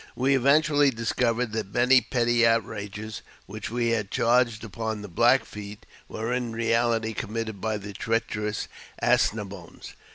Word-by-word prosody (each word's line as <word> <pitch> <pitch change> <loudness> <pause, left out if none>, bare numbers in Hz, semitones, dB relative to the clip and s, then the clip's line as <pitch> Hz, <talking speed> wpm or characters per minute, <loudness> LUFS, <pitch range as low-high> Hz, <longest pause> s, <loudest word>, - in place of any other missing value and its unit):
We 135 +2 +2
eventually 145 +2 +4
discovered 115 0 -1
that 105 -3 -4
many 125 +1 +5
petty 120 -1 +1
outrages, 110 -2 -1 0.2
which 105 +1 -7
we 120 0 0
had 110 -3 -1
charged 120 -1 +2
upon 110 -1 -4
the - - -6
Black 120 +8 +3
Feet, 105 0 -9 0.2
were 115 +3 -3
in 125 -2 -2
reality 115 -1 +1
committee 115 +1 -3
by 110 +1 -3
the 100 0 -8
treacherous 105 -1 -2 0.3
As - - +3
ne - - -5
boines. - - -11
115 Hz, 150 wpm, -26 LUFS, 105-120 Hz, 0.3 s, many